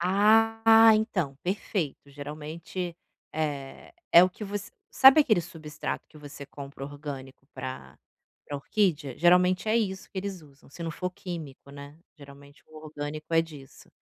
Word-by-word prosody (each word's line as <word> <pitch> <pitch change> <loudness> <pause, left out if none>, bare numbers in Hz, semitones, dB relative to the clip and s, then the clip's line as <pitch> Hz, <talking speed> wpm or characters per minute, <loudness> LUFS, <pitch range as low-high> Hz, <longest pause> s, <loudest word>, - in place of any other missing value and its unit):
Ah, 225 +4 +5
então, 185 -11 -1
perfeito, 175 -7 -3
geralmente, 155 +5 -6 0.4
eh, 145 - -4 0.2
é 170 - +9
o 185 - -1
que 210 - -8
você 205 0 -5 0.2
sabe 270 +3 +8
aquele 220 -11 +3
substrato 155 -2 -6
que 155 - -16
você 145 -1 -10
compra 140 -1 -9
orgânico 140 -2 -9
para 65 - -8 0.5
para 145 - -5
orquídea? 155 - 0
Geralmente 180 +3 +4
é 225 - +3
isso 190 -4 -2
que 190 - -6
eles 190 -3 -5
usam, 140 -2 -20
se 170 - -10
não 165 - -3
for 180 +3 -4
químico, 160 -7 -8
né. 140 +1 -11 0.2
Geralmente 140 0 -15
o 155 - -16
orgânico 150 +1 -7
é 165 - +5
disso. 150 -5 -11
160 Hz, 150 wpm, -27 LUFS, 145-190 Hz, 0.5 s, é